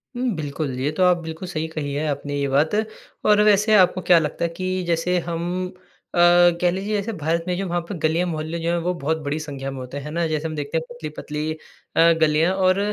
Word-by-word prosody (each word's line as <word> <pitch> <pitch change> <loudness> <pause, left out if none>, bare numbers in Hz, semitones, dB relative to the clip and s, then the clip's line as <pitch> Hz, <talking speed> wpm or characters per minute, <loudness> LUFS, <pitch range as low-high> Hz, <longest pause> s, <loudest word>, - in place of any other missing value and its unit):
हुँ, 250 0 0
बिल्कुल, 145 -2 -3
ये 145 +3 0
तो 185 - +3
आप 180 -1 +5
बिल्कुल 160 +3 -6
सही 160 -2 -3
कही 150 -3 -4
है 150 +2 -1
आपने 145 0 -3
ये 140 - 0
बात। 145 +4 +2 0.6
और 210 0 +5
वैसे 210 +1 +4
आपको 185 0 +4
क्या 175 -1 +5
लगता 150 +1 -3
है - - -1
कि 185 0 -2
जैसे 170 +2 +1
हम 175 +2 -3 0.4
अ, - - +2 0.4
कह 175 -1 +3
लीजिए 200 +3 -2
जैसे 205 +3 -2
भारत 165 0 -1
में 180 - 0
जो 195 - -2
वहाँ 175 0 0
पे 200 - -3
गली 160 +2 +1
या 180 - +2
मोहल्ले 160 0 -3
जो 165 +1 -2
हैं 175 - +1
वो 180 +1 0
बहुत 160 +3 0
बड़ी 145 +2 -2
संख्या 140 -3 -5
में 135 - -7
होते 130 +2 -7
हैं, 140 - -6
है 150 - -6
ना? 170 +1 0
जैसे 155 0 -2
हम 155 - -5
देखते 145 +2 -2
हैं 160 - -2
पतली-पतली 155 -6 -5 0.4
अ, 170 +1 +6
गलियाँ 155 +3 +3
और 185 0 +3
165 Hz, 240 wpm, -22 LUFS, 150-180 Hz, 0.6 s, अ